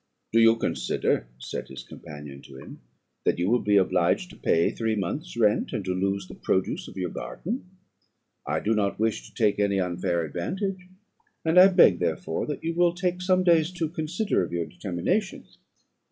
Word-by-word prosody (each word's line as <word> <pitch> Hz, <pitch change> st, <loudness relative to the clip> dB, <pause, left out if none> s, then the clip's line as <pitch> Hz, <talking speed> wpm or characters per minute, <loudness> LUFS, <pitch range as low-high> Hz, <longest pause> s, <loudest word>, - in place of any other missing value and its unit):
"'Do 115 Hz, -, +5 dB
you 115 Hz, 0 st, +6 dB
consider,' 110 Hz, -, -1 dB
said 65 Hz, -, -6 dB
his 65 Hz, -1 st, -9 dB
companion 75 Hz, -2 st, -10 dB
to 65 Hz, -, -13 dB
him, 65 Hz, -, -12 dB, 0.4 s
'that -, -, +1 dB
you 90 Hz, +1 st, 0 dB
will 120 Hz, +4 st, +3 dB
be 105 Hz, -1 st, +3 dB
obliged 95 Hz, -, +2 dB
to -, -, -13 dB
pay 85 Hz, -, +2 dB
three 110 Hz, -1 st, -1 dB
months' 145 Hz, -, -4 dB
rent, 105 Hz, -3 st, +2 dB
and 100 Hz, -, -3 dB
to 95 Hz, -, -1 dB
lose 95 Hz, +1 st, -1 dB
the -, -, -10 dB
produce 95 Hz, -, -1 dB
of -, -, -11 dB
your 90 Hz, -2 st, -2 dB
garden? 210 Hz, +1 st, -5 dB, 0.7 s
I -, -, -2 dB
do 110 Hz, -, +1 dB
not 100 Hz, -2 st, 0 dB
wish 110 Hz, 0 st, -1 dB
to -, -, -28 dB
take 105 Hz, -3 st, +2 dB
any 100 Hz, -1 st, +2 dB
unfair 90 Hz, -1 st, -1 dB
advantage, 185 Hz, -, -4 dB, 0.6 s
and 165 Hz, +3 st, +5 dB
I 185 Hz, -, +10 dB
beg 180 Hz, -, +5 dB
therefore 80 Hz, -1 st, -2 dB
that 150 Hz, -, -5 dB
you 165 Hz, +1 st, -1 dB
will 175 Hz, 0 st, +3 dB
take 180 Hz, 0 st, -1 dB
some 185 Hz, 0 st, +2 dB
days 165 Hz, -3 st, +4 dB
to 165 Hz, -3 st, -2 dB
consider 170 Hz, +6 st, -1 dB
of -, -, -5 dB
your 85 Hz, -1 st, -1 dB
determination.' 95 Hz, -, -2 dB
105 Hz, 185 wpm, -26 LUFS, -, 0.7 s, I